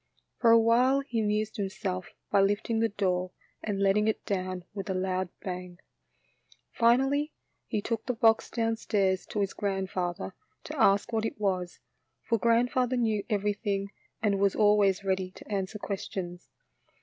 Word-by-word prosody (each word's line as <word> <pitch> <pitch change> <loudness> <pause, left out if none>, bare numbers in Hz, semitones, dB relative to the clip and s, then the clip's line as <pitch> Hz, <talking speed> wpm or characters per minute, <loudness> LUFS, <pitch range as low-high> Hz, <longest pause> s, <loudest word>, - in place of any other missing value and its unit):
For 235 - +4
a 230 - +8
while 250 +4 +4
he 245 -4 -3
amused 215 0 0
himself 190 -2 -3 0.2
by 200 - +5
lifting 205 +3 +1
the 225 0 +2
door 185 -3 -1 0.3
and 205 -2 -2
letting 200 +2 +3
it 220 - -1
down 185 -3 -2
with 195 -1 -5
a 190 - 0
loud 185 0 -1
bang. 180 -1 -5 0.9
Finally 270 +6 +2 0.3
he 210 -3 -2
took 225 -2 -3
the 250 - 0
box 225 -1 +3
downstairs 220 -5 0
to 210 - -2
his 195 - -1
grandfather 185 - -2 0.3
to - - -4
ask 200 +4 +3
what 220 -1 +1
it 225 - -3
was, 185 -4 -1 0.5
for 230 -2 0
grand 235 +2 +3
father 255 0 +1
knew 220 -4 +1
everything 205 -1 -1 0.3
and 200 -2 +2
was 200 -1 +2
always 205 -2 +4
ready 190 -1 0
to - - -13
answer 195 +1 -2
questions. 185 -3 -5
205 Hz, 155 wpm, -29 LUFS, 190-225 Hz, 0.9 s, a